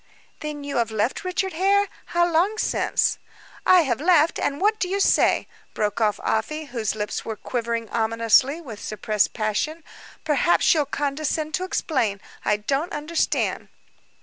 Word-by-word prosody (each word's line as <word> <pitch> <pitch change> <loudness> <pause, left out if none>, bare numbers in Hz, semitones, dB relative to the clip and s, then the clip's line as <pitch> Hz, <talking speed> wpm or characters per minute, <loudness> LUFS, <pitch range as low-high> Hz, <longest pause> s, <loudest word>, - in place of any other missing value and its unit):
"Then 300 -1 -5
you 285 -2 -3
have 235 -2 +1
left 220 - -1
Richard 370 +1 -2
Hare? 400 +4 +3 0.2
How 345 0 +2
long 350 +6 +1
since?" - - +1 0.5
"I 370 -1 +7
have 265 -4 -1
left 330 -1 +4
what 405 +10 +1
do 365 - 0
you 395 +1 -1
say?" - - +3 0.3
broke 210 +1 -1
off 210 -2 +2
Afy, 305 +8 -1
whose 220 -4 -1
lips 210 -1 -3
were 220 - -4
quivering 230 +1 -3
ominously 230 +6 +2
with 230 -11 -9
suppressed 215 0 0
passion. 235 +9 -2 0.4
"Perhaps 315 +2 +3
you'll 300 -4 +1
condescend 300 +2 -2
to 370 - -1
explain. 260 - -1 0.2
I 210 - +2
don't 275 - -2
understand." 305 +3 -1
285 Hz, 150 wpm, -23 LUFS, 225-340 Hz, 0.5 s, I